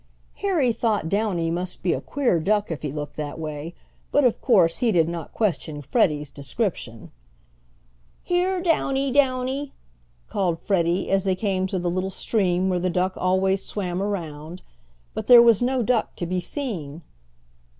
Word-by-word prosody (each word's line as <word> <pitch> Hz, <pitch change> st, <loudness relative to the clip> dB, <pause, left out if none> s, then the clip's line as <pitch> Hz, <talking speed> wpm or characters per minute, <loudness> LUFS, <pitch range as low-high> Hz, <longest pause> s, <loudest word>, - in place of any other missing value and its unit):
Harry 325 Hz, -12 st, +1 dB
thought 220 Hz, -7 st, 0 dB
Downy 185 Hz, -4 st, 0 dB
must 180 Hz, +2 st, -4 dB
be 175 Hz, -, +2 dB
a -, -, -3 dB
queer 255 Hz, -11 st, 0 dB
duck 205 Hz, +3 st, 0 dB
if 160 Hz, -, -4 dB
he 150 Hz, -, -3 dB
looked 145 Hz, 0 st, -6 dB
that 150 Hz, -1 st, -4 dB
way, 155 Hz, +1 st, -6 dB, 0.4 s
but, 290 Hz, -, +3 dB
of 245 Hz, -3 st, +2 dB
course, 185 Hz, -10 st, +4 dB
he 240 Hz, -3 st, +2 dB
did 165 Hz, -5 st, +3 dB
not 170 Hz, -1 st, -5 dB
question 160 Hz, -8 st, -2 dB
Freddie's 150 Hz, -, +1 dB
description. 140 Hz, -, -3 dB, 1.1 s
"Here, 360 Hz, +1 st, 0 dB
Downy, 275 Hz, -5 st, +1 dB
Downy!" 265 Hz, +1 st, +1 dB, 0.5 s
called 180 Hz, -5 st, 0 dB
Freddie, 175 Hz, -1 st, 0 dB
as 195 Hz, -1 st, +3 dB
they 190 Hz, -2 st, +1 dB
came 190 Hz, -1 st, -1 dB
to 190 Hz, -, -3 dB
the 175 Hz, -1 st, -1 dB
little 185 Hz, +2 st, -1 dB
stream 190 Hz, -2 st, 0 dB
where 180 Hz, -1 st, +1 dB
the 180 Hz, +1 st, 0 dB
duck 185 Hz, +2 st, 0 dB
always 190 Hz, +1 st, +1 dB
swam 185 Hz, -3 st, -3 dB
around. 170 Hz, -4 st, -5 dB, 0.5 s
But -, -, -5 dB
there 245 Hz, -1 st, +10 dB
was 235 Hz, -3 st, +6 dB
no 250 Hz, 0 st, +1 dB
duck 235 Hz, 0 st, 0 dB
to 175 Hz, -, -3 dB
be 180 Hz, +2 st, -1 dB
seen. 175 Hz, -, -5 dB
190 Hz, 160 wpm, -24 LUFS, 170-235 Hz, 1.1 s, there